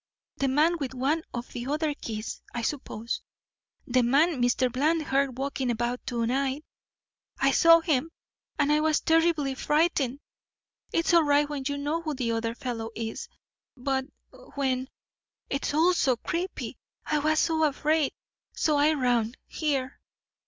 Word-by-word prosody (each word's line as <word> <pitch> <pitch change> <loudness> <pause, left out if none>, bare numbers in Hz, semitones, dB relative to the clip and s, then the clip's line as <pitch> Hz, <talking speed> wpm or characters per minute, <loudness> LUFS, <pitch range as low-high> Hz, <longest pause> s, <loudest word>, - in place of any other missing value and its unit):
The 275 - +1
man 310 +6 +3
with 265 -2 -4
one 280 +6 +1
of 240 0 -6
the 240 +1 -5
other 300 +1 0
keys, 220 -5 -6
I 240 - -2
suppose. 230 -4 -3 0.6
The 255 0 +2
man 280 +4 +3
Mr. 245 +1 +2
Bland 310 +5 +2
heard 270 -2 0
walking 270 -1 -2
about 240 +1 -1
to 235 -2 -1
night. 270 +4 -1 0.7
I 275 0 +3
saw 330 +4 +7
him 310 -2 0 0.5
and 290 -1 +2
I 300 - +4
was 310 0 +2
terribly 325 -4 +2
frightened. 290 -2 +1 0.7
It's 335 +1 +1
all 340 - +7
right 290 -1 +3
when 290 -2 -5
you 285 0 -2
know 295 +4 -1
who 310 -3 -3
the 245 -3 -1
other 230 0 -2
fellow 235 -3 -4
is, 225 -1 -5 0.5
but 265 +1 -1 0.5
when 260 -2 0 0.6
it's 275 - -1
all 325 +5 +4
so 265 -7 +2
creepy 350 +9 -4 0.3
I 305 - +1
was 310 +2 +2
afraid. 310 -2 +1 0.4
So 305 -2 +2
I 295 +2 +4
ran 245 -4 +1
here." 275 -4 -2
280 Hz, 150 wpm, -27 LUFS, 250-310 Hz, 0.7 s, saw